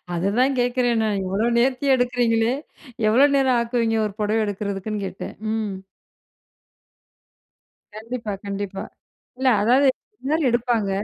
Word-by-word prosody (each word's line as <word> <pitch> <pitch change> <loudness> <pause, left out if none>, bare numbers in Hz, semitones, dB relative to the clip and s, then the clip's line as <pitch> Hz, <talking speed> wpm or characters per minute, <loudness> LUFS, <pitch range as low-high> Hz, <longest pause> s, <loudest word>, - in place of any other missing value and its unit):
அதுதான் 215 +10 +1
கேட்கிறேன் 245 -1 +1
நான் 205 -2 0
இவ்வளோ 195 +5 0
நேர்த்தியா 265 +2 +2
எடுக்கிறீங்களே! 240 -1 +1 0.5
எவ்வளோ 260 +6 +6
நேரம் 265 -2 +3
ஆக்குவிங்க 230 -1 0
ஒரு 210 - -5
புடவை 215 +2 +1
எடுக்கிறதுக்குன்னு 205 0 -3
கேட்டேன். 190 - -7 0.2
ம். 220 -2 -2 2.2
கண்டிப்பா, 225 0 -5
கண்டிப்பா. 200 -1 -4 0.5
இல்ல 260 +1 0
அதாவது 255 +6 +4 0.4
எல்லாரும் 305 +1 +1
எடுப்பாங்க 235 -3 0
230 Hz, 110 wpm, -22 LUFS, 210-250 Hz, 2.2 s, எவ்வளோ